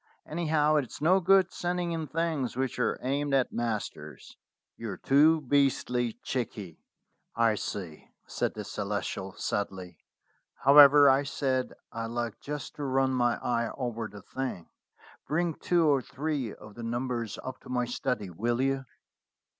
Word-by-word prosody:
Anyhow, 155 -2 +1
it's 135 -5 -3
no 175 +6 +4
good 190 0 +4
sending 175 0 -2
in 160 -2 -3
things 155 -7 -2
which 130 -1 -2
are 125 - +1
aimed 140 +2 0
at 130 -2 +1
masters. 105 - -4 0.4
You're 110 -5 -6
too 155 - +4
beastly 125 -4 +1
cheeky." 105 -9 -4 0.6
"I 115 -1 +3
see," 95 -6 -6 0.2
said - - -2
the - - -5
Celestial 95 0 -4
sadly. 95 -4 -4 0.6
"However, 145 +1 +9
I 135 +1 +5
said 135 -2 -1 0.2
I'd 115 0 -4
like 120 -1 -3
just 145 -2 -6
to 145 - -4
run 135 -1 +1
my 120 -2 +2
eye 120 -1 0
over 115 -4 -3
the 105 -2 -12
thing. 130 -8 -5 0.6
Bring 170 +2 0
two 170 +1 +1
or 140 -3 +4
three 140 -3 -3
of 105 0 -12
the 120 - -9
numbers 120 -1 -3
up 130 0 -6
to - - -15
my 125 -1 0
study, 120 -5 -3
will 120 +7 -1
you?" 135 0 0
130 Hz, 145 wpm, -29 LUFS, 115-145 Hz, 0.6 s, However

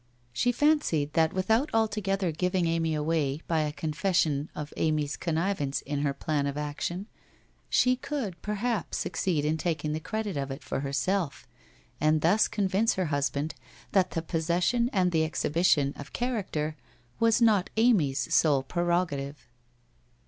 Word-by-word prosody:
She 245 - +2
fancied 245 - +2
that 160 -1 +3
without 220 +9 +1
altogether 200 -4 +1
giving 180 +2 0
Amy 165 -1 0
away 150 -1 0
by 165 -2 +1
a 150 -1 0
confession 155 -1 0
of 150 0 -6
Amy's 150 -2 0
connivance 165 -4 -1
in 145 0 -2
her 145 -1 +1
plan 140 +1 -1
of 140 0 -3
action, 150 +6 -3 0.6
she 255 0 +3
could 245 - -4
perhaps 210 0 -2
succeed 160 -6 -1
in 155 +1 +1
taking 155 -2 -1
the 155 - -2
credit 210 +1 -3
of 135 0 -2
it 135 +2 -6
for - - -3
herself 145 +4 -1 0.5
and 155 +1 +3
thus 185 +7 +4
convince 205 +2 +1
her 185 - 0
husband 145 +2 -1 0.4
that 190 -2 +3
the 165 - -3
possession 175 +9 +1
and 180 -2 +2
the 160 -2 +2
exhibition 155 -2 +2
of 145 +1 -10
character 190 -11 -2 0.4
was 230 0 +4
not 215 -6 +3
Amy's 150 - +2
sole 145 -4 +4
pre 175 +6 -3
rogative. 160 -5 0
165 Hz, 150 wpm, -28 LUFS, 150-195 Hz, 0.6 s, thus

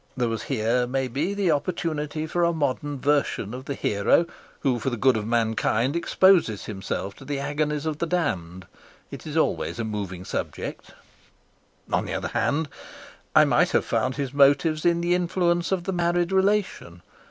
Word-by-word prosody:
There 120 -2 +1
was 115 -1 -3
here, 125 0 +1
maybe, 135 +8 -1
the 195 -4 +2
opportunity 155 0 -2
for 175 +2 0
a 170 - +3
modern 145 -2 -2
version 140 -6 0
of 130 +1 -7
the 140 - -3
hero 100 +12 +2 0.4
who 130 -4 +1
for 125 - -1
the 120 - -3
good 130 +2 +4
of 110 -1 -2
mankind 115 +3 +1
exposes 170 - +3
himself 100 -1 -4
to - - -12
the 140 +1 -3
agonies 145 +1 -2
of 155 -2 -2
the 170 - -1
damned. 95 - -2 0.5
It - - -8
is - - -3
always - - 0
a 115 - -2
moving 100 -4 -5
subject. - - -5 1.0
On - - +1
the - - -4
other - - -3
hand, 155 +2 0 0.7
I - - +8
might - - +3
have - - +2
found 130 0 0
his 140 -2 -3
motives 145 +3 +3
in 170 0 +3
the 175 +1 +1
influence 175 0 +1
of 185 -2 0
the 190 - -2
married 175 0 +1
relation. 190 - 0
145 Hz, 175 wpm, -25 LUFS, 120-170 Hz, 1.0 s, I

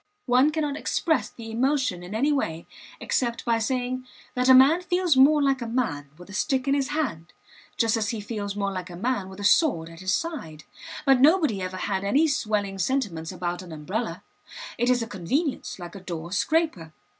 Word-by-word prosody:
One 255 +3 +4
cannot 300 -2 -2
express 320 +1 0
the 225 -1 -9
emotion 255 -5 0
in 180 +4 -7
any 280 +7 +2
way 165 - -2 0.3
except 235 -2 -1
by 230 -1 +2
saying 255 +2 -2 0.3
that 250 +1 +1
a - - +10
man 280 +7 +6
feels 355 -3 +1
more 290 +3 +6
like 270 -2 +1
a 235 - -3
man 190 - -2
with 180 - -13
a - - -10
stick 265 +4 0
in 275 - +3
his 275 -2 +1
hand, 265 - -3 0.4
just 230 -1 +2
as 220 -1 -1
he 230 -2 -3
feels 205 -1 -4
more 200 -1 -1
like 185 -1 -5
a 175 - -8
man 205 0 -2
with 190 +1 -11
a - - -5
sword 200 - +3
at 165 0 -12
his 190 0 -1
side. 240 - -3 0.4
But 270 -2 +5
nobody 300 - +4
ever 185 0 -4
had 195 0 -2
any 275 +11 +3
swelling 210 -9 -1
sentiments 190 -9 -1
about 175 0 -3
an 180 -2 -11
umbrella; 175 +10 -4 0.6
it 240 +1 +2
is 245 -2 +3
a - - -6
convenience, 255 - -2
like 175 -2 -9
a 195 - -8
door 170 -2 -6
scraper. 200 - 0
230 Hz, 200 wpm, -25 LUFS, 185-275 Hz, 0.6 s, a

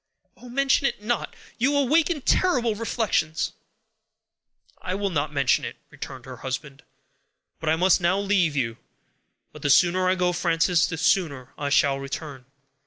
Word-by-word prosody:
"Oh! 250 - -13
mention 275 +2 +2
it 210 - -5
not! 240 +2 -2 0.2
You 280 +4 +2
awaken 300 +3 +2
terrible 250 -9 +2
reflections." 210 -8 -1 1.3
"I 185 - -3
will 200 0 -2
not 150 -2 -1
mention 140 -3 +2
it," - - -5 0.2
returned 130 -2 -9
her 130 -1 -9
husband; 135 +3 -6 0.8
"but 160 - -2
I 160 - +4
must 180 +2 +3
now 175 +2 +2
leave 195 -6 +1
you. 115 -4 -1 0.8
But - - -12
the 145 - -1
sooner 185 +5 +4
I 185 - +3
go, 180 -1 +1
Frances, 170 0 +2
the 160 - -5
sooner 160 -7 0
I 145 -1 -3
shall 140 -1 +3
return." 135 -1 -7
175 Hz, 155 wpm, -24 LUFS, 145-220 Hz, 1.3 s, I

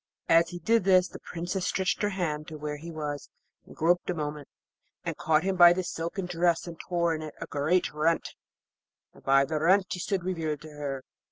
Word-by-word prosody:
As 165 0 +5
he 175 - -6
did 225 +6 +2
this 185 -1 +5
the - - -10
Princess 175 +2 -3
stretched 190 -1 0
her 205 - +2
hand 155 -6 -2
to 155 - -7
where 150 0 -4
he 165 +3 -9
was 150 -3 -5 0.4
and - - -13
groped 175 +2 +2
a 180 - 0
moment, 150 -2 -4 0.6
and - - -2
caught 155 0 +2
him 190 0 0
by 175 -1 +8
the 185 +1 -2
silken 170 +2 -4
dress 175 -1 +1
and 170 -2 -9
tore 170 -2 0
in 155 - -4
it 155 -1 -7
a - - -4
great 155 +6 0
rent, 160 +2 0 0.8
and - - -17
by 135 0 +4
the 155 +1 -2
rent 185 +5 +4
he 180 - -2
stood 190 0 -1
revealed 160 -5 -2
to 155 - -11
her. 140 -3 -5
165 Hz, 210 wpm, -28 LUFS, 150-180 Hz, 0.8 s, by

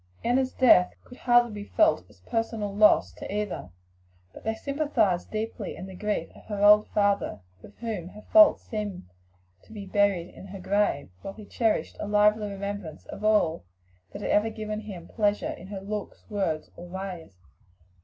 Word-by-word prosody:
Enna's 255 +2 +2
death 205 -8 +5
could 250 - -14
hardly 240 -1 +4
be 205 -1 -6
felt 320 +9 +2
as - - -21
a - - -32
personal 225 -3 -1
loss 210 0 +5
by - - -8
either, 205 - -3 0.6
but - - -12
they 220 0 -1
sympathized 245 - 0
deeply 215 -1 -4
in 185 - -8
the 190 - -9
grief 210 +3 -2
of - - -16
her 205 -1 -3
old 210 +1 +7
father, 200 - +1 0.2
with 205 - -15
whom 215 -7 -4
her 210 +3 -12
faults 320 -2 +7
seemed 210 -4 -5 0.6
to - - -21
be 210 -2 -7
buried 195 -3 +1
in 190 - -11
her 195 0 -8
grave, 190 - 0
while 195 - -7
he 215 - -11
cherished 225 +1 0
a - - -4
lively 210 0 +3
remembrance 200 -5 -6
of 205 - -9
all 210 - +2 0.5
that - - -8
had - - -1
ever 210 +2 +3
given 215 -1 -5
him 195 -6 -9
pleasure 210 -2 0
in 180 - -9
her 195 -1 -6
looks, 205 +1 -6
words, 180 -7 -2
or 175 - -10
ways. 180 - -7
205 Hz, 180 wpm, -27 LUFS, 195-220 Hz, 0.6 s, old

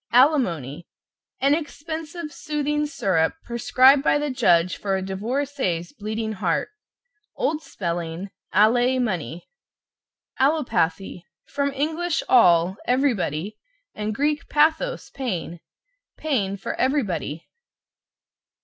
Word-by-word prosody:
=ALIMONY= 180 - +2 0.5
An 275 +2 +4
expensive 315 +1 -5
soothing 295 -1 -1
syrup, 190 - +1
prescribed 255 +3 +4
by 290 - +3
the 295 -1 -2
judge 185 -8 +3
for 195 -1 -1
a - - -3
divorcee's 200 - -2
bleeding 220 +1 -4
heart. 185 -5 -1 0.7
(Old 310 0 -1
spelling, 170 - -4 0.2
allay 245 +5 +4
money). 175 - -3 0.9
=ALLOPATHY= 225 - 0 0.2
From 280 0 -1
Eng. 310 +4 -1 0.3
all, 180 -5 +5
everybody, 215 - 0 0.3
and 215 +1 -4
Grk. 295 +2 0
pathos, 320 +12 +1
pain. 175 - -4 0.6
Pain 205 -11 -1
for - - -4
everybody. 205 - -1
240 Hz, 95 wpm, -23 LUFS, 180-290 Hz, 0.9 s, all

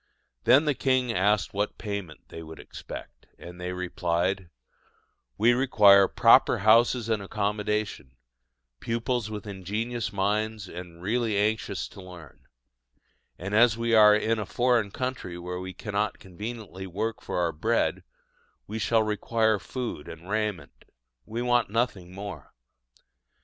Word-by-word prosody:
Then 145 +4 +6
the 150 - +2
king 130 -2 +1
asked 100 -2 +1
what 100 +1 -2
payment 100 -6 -6
they 80 - -8
would 80 0 -10
expect, - - -10
and 90 +1 -11
they 90 0 -3
replied: 90 0 -1 0.9
"We 115 +3 +5
require 105 -6 +6
proper - - +5
houses 115 +1 +5
and 110 -2 0
accommodation, 105 - -2 0.6
pupils 115 - -2
with 105 -2 -6
ingenious 105 +5 -3
minds 105 +1 -1
and 90 -1 -10
really 110 +1 0
anxious 105 -1 -1
to 100 - -12
learn; 90 -6 -13 0.9
and, 100 +3 -6
as 115 0 +5
we 115 0 0
are 105 -1 +8
in 110 +1 0
a 105 - -3
foreign 120 -4 +2
country 125 -6 -4
where 90 +1 -5
we 95 +1 -6
cannot 105 +1 -2
conveniently 95 0 -8
work 110 +5 -3
for - - -4
our 85 -2 +1
bread, 75 - 0 0.6
we 110 +2 -5
shall 110 +1 +2
require 110 0 +1
food 115 - -5
and 80 +2 -10
raiment: 105 -7 -3 0.4
we 115 +2 -3
want 120 -2 +2
nothing 105 -5 -1
more." 95 -6 -8
105 Hz, 135 wpm, -27 LUFS, 90-115 Hz, 0.9 s, are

